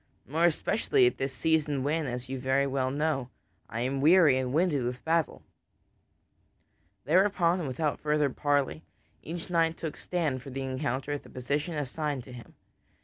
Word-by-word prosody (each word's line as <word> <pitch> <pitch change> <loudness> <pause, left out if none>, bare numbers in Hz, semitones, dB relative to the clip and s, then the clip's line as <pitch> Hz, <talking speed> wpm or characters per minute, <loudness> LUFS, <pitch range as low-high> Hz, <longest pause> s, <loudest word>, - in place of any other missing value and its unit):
More 160 +5 +1
especially 225 - +2
at 370 - +1
this 135 0 -1
season 145 +1 +1
when, 150 +1 0
as 125 0 -4
you 135 0 -4
very 135 +2 +2
well 135 -1 0
know, 140 -2 -1 0.4
I 115 - -3
am 135 +2 -1
weary 155 -4 +6
and 130 -1 -2
winded 155 -3 +2
with 125 +1 -4
battle." 165 -1 0 1.6
Thereupon 180 +1 +3
and 160 - -3
without 145 +3 -1
further 150 -2 +1
parley, 145 +2 0 0.4
each 170 +2 -6
knight 165 -1 +2
took 160 -2 -5
stand 155 -8 -2
for 135 - -9
the 135 +1 -5
encounter 130 +1 -2
at 145 - -2
the - - -16
position 145 +6 -2
assigned 145 -1 -3
to 130 - -13
him. 120 -1 -12
145 Hz, 165 wpm, -29 LUFS, 130-160 Hz, 1.6 s, weary